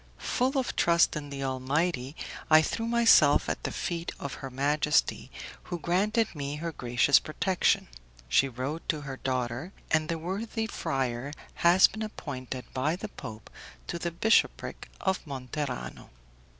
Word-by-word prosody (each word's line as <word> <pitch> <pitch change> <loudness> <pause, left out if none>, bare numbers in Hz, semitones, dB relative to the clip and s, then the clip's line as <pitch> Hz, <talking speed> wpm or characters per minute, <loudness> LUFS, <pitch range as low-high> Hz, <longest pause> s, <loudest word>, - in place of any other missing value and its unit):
"Full 260 - 0
of 260 - -1
trust 170 0 +4
in 145 -1 -5
the 140 -1 -5
Almighty, 135 +2 -1 0.3
I 155 0 +7
threw 225 +7 -2
myself 230 -11 +5
at - - -2
the - - -3
feet 170 -2 -3
of 140 - -5
her 135 - -5
majesty, 145 +3 +1 0.4
who 175 - -4
granted 205 +7 +1
me 145 -2 -4
her 165 +2 -4
gracious 125 0 +3
protection. 180 +4 +1 0.4
She 135 - +3
wrote 130 +6 -4
to 155 -2 0
her 135 -2 -6
daughter, 130 +6 -2 0.2
and 155 0 +2
the 165 - 0
worthy 200 +7 -3
friar 135 - -2 0.3
has 175 +2 +7
been 220 - -1
appointed 130 - -5
by 145 +5 0
the 205 +3 -6
Pope 110 - -9 0.3
to 170 - -4
the 170 - -1
bishopric 220 +7 +1
of 190 -1 0
Monterano. 135 0 -5
150 Hz, 150 wpm, -29 LUFS, 135-175 Hz, 0.4 s, I